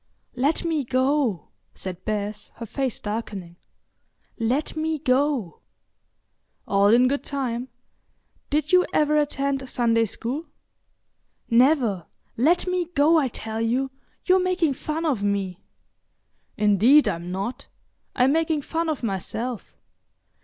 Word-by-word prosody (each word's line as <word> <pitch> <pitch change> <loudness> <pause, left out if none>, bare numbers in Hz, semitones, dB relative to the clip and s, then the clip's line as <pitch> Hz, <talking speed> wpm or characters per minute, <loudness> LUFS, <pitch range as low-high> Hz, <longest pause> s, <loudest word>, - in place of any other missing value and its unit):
"Let 285 +7 +1
me 320 -3 0
go," 255 - 0 0.3
said 185 -1 -7
Bess, 210 0 -3
her 230 - -7
face 260 +2 -2
darkening. 205 -5 -5 0.8
"Let 250 +8 0
me 315 0 -1
go." 260 - 0 1.1
"All 200 0 +3
in 240 +4 +5
good 280 +2 -1
time. 255 -3 -3 0.8
Did 300 0 0
you 365 0 +6
ever 300 0 +3
attend 275 -2 -1
Sunday 230 -2 +2
school?" 255 +9 -5 1.0
"Never. 235 - +3 0.3
Let 320 +9 +3
me 365 -1 0
go, 310 +3 +5
I 280 - +1
tell 220 -2 -5
you; 255 +4 0 0.3
you're 370 0 +5
making 365 -5 +1
fun 305 +4 -4
of 270 -10 0
me." 200 -3 -1 1.0
"Indeed, 215 +8 +5
I'm 170 +1 -3
not. 195 +7 -4 0.5
I'm 255 +1 +4
making 320 -1 +1
fun 325 +2 -2
of 300 -5 -3
myself.... 225 +3 -4
255 Hz, 120 wpm, -24 LUFS, 215-300 Hz, 1.1 s, you